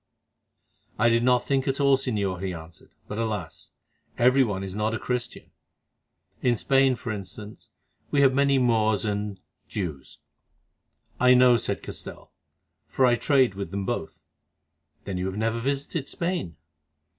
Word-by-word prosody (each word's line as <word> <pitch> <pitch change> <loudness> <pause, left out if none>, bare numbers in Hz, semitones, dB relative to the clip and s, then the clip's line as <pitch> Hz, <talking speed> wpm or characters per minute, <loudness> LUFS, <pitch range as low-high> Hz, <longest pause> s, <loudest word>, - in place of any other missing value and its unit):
"I 115 - +4
did 115 0 +3
not 125 0 +3
think 135 -1 0
at 135 +1 0
all, 140 -1 +5
Señor," 100 -8 -2
he 95 -2 -3
answered; 80 0 -12 0.2
"but 105 - -5
alas! 105 -8 -4 0.5
every 130 +3 +5
one 100 -5 -2
is 95 -1 -6
not 105 +2 -1
a - - -4
Christian. 125 -1 -4 0.9
In 125 -2 +2
Spain, 135 +3 +3
for 120 -2 -5
instance, 105 +1 -8 0.4
we 140 - +2
have 135 -2 +5
many 140 0 +3
Moors 110 -4 +2
and—Jews." 100 -6 -5 1.0
"I 125 0 +6
know," 125 -1 +6
said - - -3
Castell, - - -9 0.6
"for 130 - +2
I 125 - +4
trade 130 -2 +3
with 100 -3 -5
them 100 +1 -4
both." - - -3 0.9
"Then 95 -2 -3
you 90 - -2
have 95 +1 -4
never 115 +1 0
visited 140 +3 -3
Spain?" 170 - -3
115 Hz, 145 wpm, -26 LUFS, 100-130 Hz, 1.0 s, I